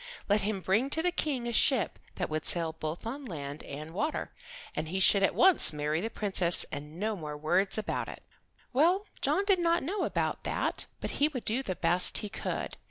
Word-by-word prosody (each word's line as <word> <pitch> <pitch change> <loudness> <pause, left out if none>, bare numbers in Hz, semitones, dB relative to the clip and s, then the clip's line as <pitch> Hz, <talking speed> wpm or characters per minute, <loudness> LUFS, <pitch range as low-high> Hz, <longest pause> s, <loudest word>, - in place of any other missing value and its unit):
Let 205 +1 +2
him 200 -1 -2
bring 215 +9 +1
to 320 +3 +2
the 360 - +2
King 275 -8 -2
a 235 - -3
ship 245 -1 +2 0.2
that 180 - -2
would 155 0 -3
sail 165 -2 +3
both 160 +4 -6
on 270 +5 -5
land 145 - -7
and 155 +3 -8
water, 305 - -3 0.4
and 155 - -3
he 190 +3 -2
should 195 +1 +5
at 195 - +2
once 375 - +6
marry 150 +2 -1
the 225 - -3
Princess, 190 -6 +2
and 150 +2 -7
no 215 +1 -1
more 150 -5 -7
words 190 +7 +1
about 215 - -3
it. - - -10 0.5
Well, 350 +10 +3 0.2
John 395 - +1
did 390 -3 +3
not 340 -2 +1
know 385 +8 -2
about - - -2
that, - - -1
but - - -3
he 295 - +6
would 265 -6 -6
do 230 +5 +1
the 190 -8 -4
best 175 +2 +3
he 210 - -4
could. 220 - -5
200 Hz, 210 wpm, -29 LUFS, -, 0.5 s, once